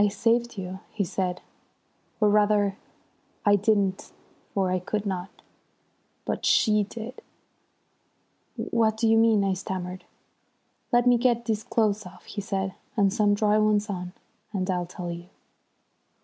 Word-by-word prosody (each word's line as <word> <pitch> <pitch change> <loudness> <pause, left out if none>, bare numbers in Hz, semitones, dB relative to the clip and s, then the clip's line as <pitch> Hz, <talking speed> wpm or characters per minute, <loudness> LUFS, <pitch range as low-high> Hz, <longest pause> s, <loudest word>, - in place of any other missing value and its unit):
"I - - +5
saved 230 +3 +1
you," 190 0 -5
he 205 - -2
said, 180 0 -2 0.8
"or 215 - +4
rather 205 -1 +3 0.7
I 205 0 +6
didn't, 200 -2 +1 0.4
for 190 -2 0
I 185 - +1
could 210 +3 -3
not. 185 -1 -3 1.0
But - - -3
she 210 -2 +4
did." 230 +4 -8 1.3
"What 220 -2 +1
do 225 0 +2
you 225 - +5
mean?" 225 -2 +4
I 195 -1 +1
stammered. 185 -1 -5 0.9
"Let 240 -1 +4
me 245 -1 +5
get 235 -1 +2
these 220 -2 0
clothes 215 -3 0
off," 180 0 -15
he 205 - -5
said, 195 -1 -2 0.2
"and 200 -2 +3
some 210 -2 +3
dry 210 0 +3
ones 210 0 +2
on; 180 -1 -5 0.4
and 190 -3 -2
I'll 180 -1 -1
tell 175 -1 -6
you." 170 +1 -8
205 Hz, 145 wpm, -26 LUFS, 190-220 Hz, 1.3 s, I